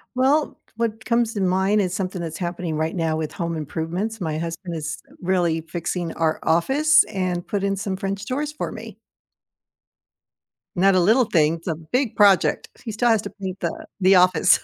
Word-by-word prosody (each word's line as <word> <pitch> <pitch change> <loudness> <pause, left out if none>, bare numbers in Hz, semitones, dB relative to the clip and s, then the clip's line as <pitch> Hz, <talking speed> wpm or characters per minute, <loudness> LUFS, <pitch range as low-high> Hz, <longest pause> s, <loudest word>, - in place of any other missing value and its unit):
Well, 275 +4 +2 0.2
what 220 -1 -2
comes 235 -1 +1
to 205 - -2
mind 190 +3 +2
is 180 -2 -1
something 185 -2 -3
that's 160 -2 -5
happening 175 -2 -3
right 160 +3 -1
now 165 -2 0
with 155 -1 -3
home 170 -2 -3
improvements, 175 +8 -4
my 160 -3 -2
husband 170 +2 -5
is, 160 0 -4
uh, - - -19
really 175 -3 +1
fixing 170 +1 -4
our 160 -1 0
office 290 - +4
and 185 -4 -2
put 200 -2 -2
in 200 0 +1
some 195 0 -3
French 195 +1 -4
doors 290 +5 -2
for 300 - -4
me. - - -9 1.8
Not 190 +2 +4
a - - +5
little 220 +8 +4
thing, 160 -5 +2
it's 165 +2 -12
a 165 - 0
big 210 - -2
project. 200 -4 +4 0.2
He 230 - -4
still 235 +3 +1
has 225 -3 +3
to - - -5
paint 190 -2 -7
the 170 - -4
the 190 0 +5
office. 185 0 +5
185 Hz, 190 wpm, -23 LUFS, 165-215 Hz, 1.8 s, a